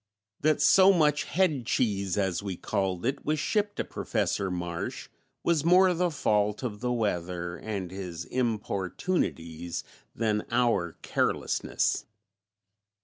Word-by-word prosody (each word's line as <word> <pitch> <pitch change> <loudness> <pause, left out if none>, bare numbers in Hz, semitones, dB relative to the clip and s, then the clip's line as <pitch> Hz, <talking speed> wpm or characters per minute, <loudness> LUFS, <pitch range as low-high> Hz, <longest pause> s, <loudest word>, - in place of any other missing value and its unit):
That 155 -1 +2
so 190 0 +7
much 150 -5 +3
"head 155 -10 +1
cheese," 100 -7 0
as 95 -3 0
we 95 -3 -4
called 95 -2 -2
it, 135 +3 -1
was 155 +1 0
shipped 205 +6 0
to - - -1
Professor 100 -2 -1
Marsh 85 -2 -4 0.3
was 165 -4 +2
more 180 +2 +6
the 175 +1 +1
fault 105 -7 +1
of 105 -5 -3
the 125 +1 -1
weather 90 -6 -2
and 100 -4 -4
his 90 -3 -6
importunities 95 - -2 0.3
than 105 -2 0
our 115 -8 +1
carelessness. - - 0
105 Hz, 125 wpm, -28 LUFS, 90-150 Hz, 0.3 s, so